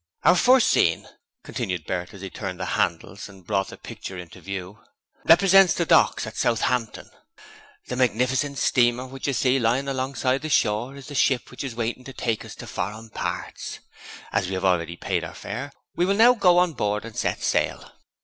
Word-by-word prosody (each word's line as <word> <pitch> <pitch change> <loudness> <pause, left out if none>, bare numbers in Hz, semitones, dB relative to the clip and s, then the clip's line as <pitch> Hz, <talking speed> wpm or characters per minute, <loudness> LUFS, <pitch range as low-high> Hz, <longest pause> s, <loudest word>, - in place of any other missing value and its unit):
'Our - - +6
first 250 +6 +5
scene,' 80 - +2 0.4
continued 90 -4 -4
Bert 90 -1 -3
as 100 - -12
he 95 - -6
turned 95 -4 -6
the - - -2
handles 85 +5 -2
and 95 -3 -16
brought 95 -1 0
the - - -10
picture 95 - -8
into 90 -1 -10
view, 100 +1 -6 0.5
'represents 190 +1 +6
the 170 - 0
docks - - +4
at - - -8
Southampton; 115 0 0 0.8
the 125 - -4
magnificent 130 +3 +1
steamer 125 0 +2
which 135 +1 -6
you 140 - +1
see 130 +1 +2
lying 125 +4 +1
alongside 130 0 -1
the 155 - -4
shore 120 0 +1
is 140 -1 -11
the 145 - -9
ship 130 -2 +1
which 125 - -7
is 130 -4 -5
waiting 120 +2 -3
to 135 - -9
take 115 -3 -2
us - - -10
to - - -9
foreign 110 +2 -5
parts. - - -5 0.6
As 90 - +1
we 95 - -3
have 95 - -2
already 85 -2 +1
paid - - -2
our - - -7
fare, 125 +8 -6 0.2
we 175 - +2
will 195 - +2
now 235 +4 +7
go 185 -6 +4
on 180 -2 +3
board 105 -3 -1
and 115 -2 -10
set - - -2
sail.' - - -1
120 Hz, 195 wpm, -24 LUFS, 100-140 Hz, 0.8 s, now